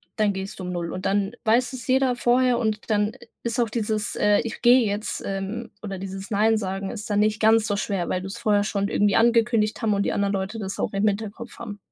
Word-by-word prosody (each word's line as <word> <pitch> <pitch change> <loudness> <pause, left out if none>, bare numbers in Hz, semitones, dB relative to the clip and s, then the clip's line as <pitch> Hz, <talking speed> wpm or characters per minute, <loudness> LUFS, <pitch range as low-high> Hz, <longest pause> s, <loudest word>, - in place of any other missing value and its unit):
dann 215 -2 +2
gehst 195 0 -6
du - - -5
um 180 - -4
0:00. 170 -2 -3
Und 185 - -3
dann 200 0 +1
weiß 245 +4 +2
es 245 -2 -7
jeder 260 -1 +3
vorher 245 0 +3
und 220 -1 -2
dann 210 0 +1 0.3
ist 235 +1 -2
auch 235 - +2
dieses, 215 -1 -1
äh: 210 0 +3
„Ich 230 - -6
gehe 245 0 +6
jetzt“, 205 +2 -3
ähm, 195 +4 -4
oder 195 -3 -5
dieses 195 +1 -7
Nein 220 +1 +3
sagen 195 -1 -3
ist 215 -2 -7
dann 205 - +1
nicht 215 0 +2
ganz 220 0 +4
so 205 -2 0
schwer, 195 -3 -2
weil 185 - -1
du's 195 +4 -6
vorher 210 -3 +2
schon 200 -1 -1
irgendwie 205 0 +2
angekündigt 230 -2 +3
haben 220 -2 +2
und 200 0 +1
die - - 0
anderen 200 0 0
Leute 195 +3 -3
das 195 -1 -4
auch - - -2
im 195 +2 +1
Hinterkopf 215 +3 -4
haben. 210 -3 -7
210 Hz, 235 wpm, -24 LUFS, 200-230 Hz, 0.3 s, gehe